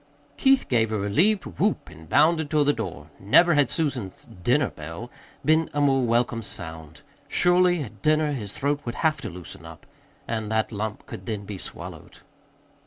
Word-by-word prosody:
Keith 270 0 +3
gave 115 -3 +2
a 110 - 0
relieved 170 - +2
whoop 85 - -1
and 80 0 -14
bounded 160 -1 +3
toward 150 -2 +2
the 145 - +4
door. 90 - -6
Never 170 - +5
had 145 -4 +3
Susan's 130 - -3 0.2
"dinner 130 +2 +2
bell" 80 +10 -8 0.3
been 160 +1 +3
a - - +1
more 135 -2 +3
welcome 115 0 +1
sound. 80 -6 -8 0.2
Surely, 180 -2 +3
at 110 -5 -11
dinner, 155 0 +2
his 105 -8 -4
throat 145 +1 0
would 120 0 -5
have 155 -2 +1
to 110 - -4
loosen 90 -1 -10
up, - - -12 0.4
and 110 -2 -3
that 110 +1 0
lump 105 0 -4
could - - -9
then 105 -3 -4
be 100 -2 -7
swallowed. - - -9
120 Hz, 175 wpm, -25 LUFS, 100-155 Hz, 0.4 s, Never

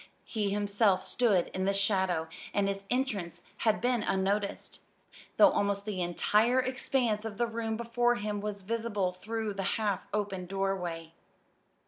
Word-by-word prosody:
He 210 -3 -1
himself 200 -1 +2
stood 210 -8 +2
in 185 0 -2
the 195 0 +1
shadow, 190 -5 +1 0.3
and 200 -1 +2
his 195 0 -3
entrance 200 -10 -2
had 220 -2 +2
been 245 -1 +1
unnoticed, 200 +1 -1 0.6
though - - +8
almost 200 0 0
the 200 -4 -3
entire 210 +8 +3
expanse 255 -4 0
of 220 -3 -5
the 240 - +2
room 225 -1 -3
before 240 +1 +1
him 210 -2 -3
was 205 -1 -4
visible 210 -3 -1
through 215 +3 -4
the 195 - -3 0.2
half 210 -3 -1
open 195 -3 -2
doorway. 180 -4 -2
205 Hz, 145 wpm, -30 LUFS, 195-225 Hz, 0.6 s, though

